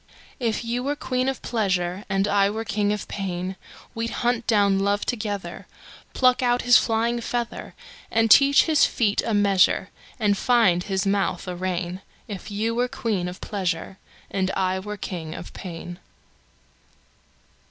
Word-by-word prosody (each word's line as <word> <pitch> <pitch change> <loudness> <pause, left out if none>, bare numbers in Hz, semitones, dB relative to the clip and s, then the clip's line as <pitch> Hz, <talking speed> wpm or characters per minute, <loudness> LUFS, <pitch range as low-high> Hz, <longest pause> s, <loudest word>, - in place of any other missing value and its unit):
If 230 -2 -1
you 240 +2 -1
were 280 +3 -1
queen 255 -2 -1
of 270 - -5
pleasure, 190 -4 -1
And 195 +1 +1
I 200 -1 +3
were 220 +2 -4
king 205 -1 0
of 210 -1 -3
pain, 185 -1 -4 0.4
We'd 230 0 -3 0.2
hunt 240 -1 +1
down 200 -4 +3
love 200 +1 0
together, 205 -7 -4 0.5
Pluck 255 -1 +4
out 245 0 +2
his 245 0 +6
flying 230 +1 +2
feather, 235 0 -4 0.3
And 225 -1 +2
teach 280 +3 +7
his 315 -3 +3
feet 215 -3 +1
a 225 - 0
measure, 200 -1 +3 0.3
And 205 -2 +2
find 225 -8 +3
his 190 0 -1
mouth 195 -1 0
a 180 - -4
rein; 180 0 -3 0.3
If 205 -3 -7
you 215 +3 -1
were 245 +2 +1
queen 210 -7 -2
of 180 +2 -8
pleasure. 190 -2 -3 0.3
And 190 -1 0
I 190 0 0
were 210 +2 -6
king 165 -5 -5
of 170 - -9
pain. 175 0 -8
205 Hz, 155 wpm, -24 LUFS, 190-230 Hz, 0.5 s, teach